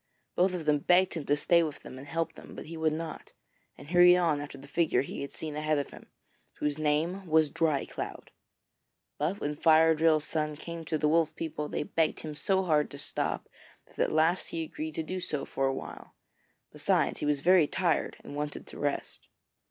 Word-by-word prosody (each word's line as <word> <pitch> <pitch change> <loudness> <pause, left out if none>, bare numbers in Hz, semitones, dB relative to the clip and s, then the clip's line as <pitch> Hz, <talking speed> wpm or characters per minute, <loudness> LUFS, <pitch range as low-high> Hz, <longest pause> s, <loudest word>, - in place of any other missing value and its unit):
Both 180 +1 +2
of 165 -3 -5
them 150 -1 +3
begged 180 +4 +3
him 160 -4 -5
to 145 - +4
stay 170 +3 +4
with 155 -3 -3
them 130 - -10
and 140 - -11
help 165 +2 -2
them, - - -12
but - - -8
he 165 - -8
would 160 -1 +1
not, 160 0 -6 0.4
and 145 - -12
hurried 180 0 +7
on 165 -5 +1
after 145 -1 -8
the 135 +1 -12
figure 160 0 +1
he - - -6
had 140 - -5
seen 155 -2 -5
ahead 155 0 0
of 140 - -3
him, - - -13 0.5
whose 150 0 -2
name 160 +6 0
was 155 -2 +3
Dry 155 -4 +1
cloud. - - -7 0.9
But 165 +8 -1
when 150 +1 -2
Fire 160 +1 +5
drill's 155 -1 +3
son 150 -1 -1
came 165 +2 -7
to 155 +1 -1
the 150 - +1
Wolf 160 0 +2
people 150 -2 -4
they - - -2
begged 160 +1 0
him 155 -1 -6
so 190 +5 +1
hard 155 -4 +2
to 140 - -9
stop 140 - -2 0.4
that - - -20
at - - +2
last 160 +4 +2
he 165 -1 -3
agreed 155 0 -6
to 160 - -2
do 185 +4 -4
so 150 -6 -3
for 135 - -1
a - - +1
while; - - -9 0.6
besides - - +1
he - - -2
was 145 -2 +1
very 175 -1 +5
tired, 170 -2 0
and 145 - -9
wanted 150 0 -4
to - - -10
rest. 145 -1 -3
155 Hz, 215 wpm, -29 LUFS, 150-165 Hz, 0.9 s, hurried